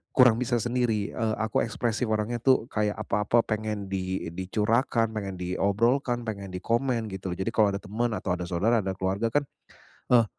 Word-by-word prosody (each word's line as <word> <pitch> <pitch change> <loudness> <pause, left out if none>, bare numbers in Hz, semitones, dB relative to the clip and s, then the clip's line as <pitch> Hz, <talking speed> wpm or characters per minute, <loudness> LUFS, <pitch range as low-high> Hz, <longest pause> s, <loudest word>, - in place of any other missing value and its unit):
kurang 125 -4 +7
bisa 125 -1 0
sendiri, 120 -3 0
eee, 110 -1 -1
aku 110 0 0
ekspresif 115 +1 -1
orangnya 110 +2 0
tuh 130 -2 +3
kayak 105 -1 0
apa-apa 110 +3 +2
pengen 110 -2 -2
di 95 -2 -2
dicurahkan 110 +5 +1
pengen 100 -3 -3
diobrolkan, 115 +8 +1
pengen 100 -3 -5
dikomen, 115 +4 0
gitu 95 -1 -5
loh. - - -14
Jadi 95 +4 -1
kalau 105 -2 +4
ada 100 - -5
temen 115 +4 -1
atau 95 - -3
ada 90 0 -4
saudara 105 +7 +2
atau 95 0 -2
keluarga 95 +4 0
kan, 145 0 +2 0.7
"Eh 120 -2 +6
110 Hz, 175 wpm, -27 LUFS, 100-120 Hz, 0.7 s, kurang